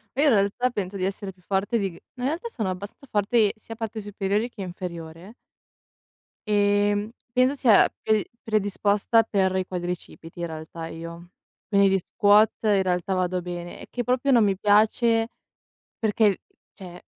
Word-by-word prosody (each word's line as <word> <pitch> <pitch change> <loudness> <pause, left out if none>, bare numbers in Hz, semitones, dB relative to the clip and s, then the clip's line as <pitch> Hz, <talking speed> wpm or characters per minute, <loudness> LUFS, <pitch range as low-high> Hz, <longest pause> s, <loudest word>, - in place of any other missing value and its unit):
Ma 275 - +1
io - - +4
in 300 - +5
realtà 205 +5 +2
penso 200 -4 -4
di 185 - -1
essere 195 0 -4
più 180 - -27
forte 195 +5 0
di 195 -3 -1
g - - -14 0.2
in 250 - -3
realtà 330 - -2
sono 220 - -3
abbastanza 200 +9 -7
forte 210 +1 +2
sia 225 +1 -10
parte 225 -1 -5
superiori 205 +3 -1
che 220 - -10
inferiore. 175 +1 -7 1.1
Ehm, 205 0 +2 0.2
penso 255 +3 +3
sia 225 -7 +5 0.2
pe 215 -2 +2 0.2
predisposta 210 +1 +2
per 190 -2 +1
i 185 - -1
quadricipiti, 175 -2 -6
in 170 - -1
realtà, 160 0 -7
io. 170 +1 -9 0.4
Quindi 200 -1 +4
di 195 0 +3
squat 205 +4 +4
in 205 -3 +3
realtà 180 +1 0
vado 185 -1 0
bene, 175 0 -7
è - - -10
che 245 -1 -3
proprio 255 +3 +1
non 235 -4 +5
mi 195 -2 +1
piace 220 +3 +3 0.7
perché, 210 -2 +2 0.3
cioè, 180 -2 -11
205 Hz, 165 wpm, -25 LUFS, 185-220 Hz, 1.1 s, in